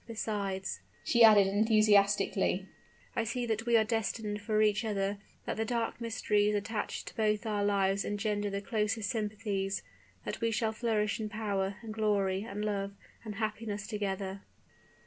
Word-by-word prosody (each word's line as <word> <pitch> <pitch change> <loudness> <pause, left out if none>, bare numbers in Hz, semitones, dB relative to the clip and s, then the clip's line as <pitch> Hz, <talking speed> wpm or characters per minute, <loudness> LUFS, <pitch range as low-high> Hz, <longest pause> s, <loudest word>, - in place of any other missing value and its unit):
Besides," 200 -4 -3 0.2
she 235 -1 +4
added, 210 -3 +8
enthusiastically, 200 -2 +3 0.5
"I 230 - +1
see 240 +2 -2
that 220 0 -2
we 235 -1 +5
are 220 - +5
destined 220 -1 -2
for 215 0 0
each 210 +1 +2
other; 200 -2 -1 0.3
that - - -3
the 220 - +1
dark 230 +1 -2
mysteries 210 -2 +1
attached 210 +1 -3
to - - -18
both 215 0 +1
our 210 -2 0
lives 200 -1 +2
engender 205 0 -1
the 200 0 -3
closest 210 0 -1
sympathies; 205 -3 -2 0.4
that - - -4
we 230 - +2
shall 220 0 0
flourish 215 -2 0
in 215 -1 -3
power, 200 -3 -1
and 220 -1 -6
glory, 200 -3 +1
and 210 -1 -4
love, 200 -1 -2 0.3
and 215 -2 -6
happiness 215 -1 -3
together." 195 -3 -3
210 Hz, 155 wpm, -31 LUFS, 200-220 Hz, 0.5 s, added